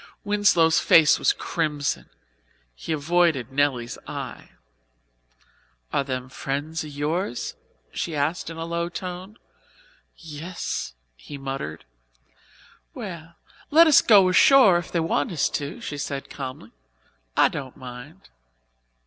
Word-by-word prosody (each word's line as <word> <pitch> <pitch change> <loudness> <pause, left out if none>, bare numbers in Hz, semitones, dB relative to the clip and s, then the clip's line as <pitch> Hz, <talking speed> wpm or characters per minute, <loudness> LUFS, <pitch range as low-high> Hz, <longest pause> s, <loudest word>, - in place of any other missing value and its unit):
Winslow's 205 -6 +3
face 160 -2 +5
was - - +3
crimson. 150 -4 -2 0.6
He - - -7
avoided 155 -4 +1
Nelly's 135 -4 0
eye. - - -7 1.4
"Are - - +2
them 130 -2 -3
people 130 - -17
friends 145 +4 -3
of 155 - -8
yours?" 150 0 -3 0.4
she 165 - -4
asked 150 +4 -1
in 165 - -8
a 165 - -4
low 170 +1 -2
tone. 185 +4 -7 0.8
"Yes," 165 - -5 0.2
he 140 - -10
muttered. 135 - -6 1.1
"Well, 165 -2 -8 0.3
let 325 +3 +7
us 310 -3 +7
go 200 -4 +6
ashore 190 0 +6
if 175 - -9
they 170 - 0
want 160 -2 0
us 160 -5 +1
to," 145 -1 -4
she 145 - -5
said 140 0 -5
calmly. 130 -2 -7 0.7
"I - - +6
don't 130 -2 -7
mind." 130 +7 -11
160 Hz, 125 wpm, -24 LUFS, 140-175 Hz, 1.4 s, let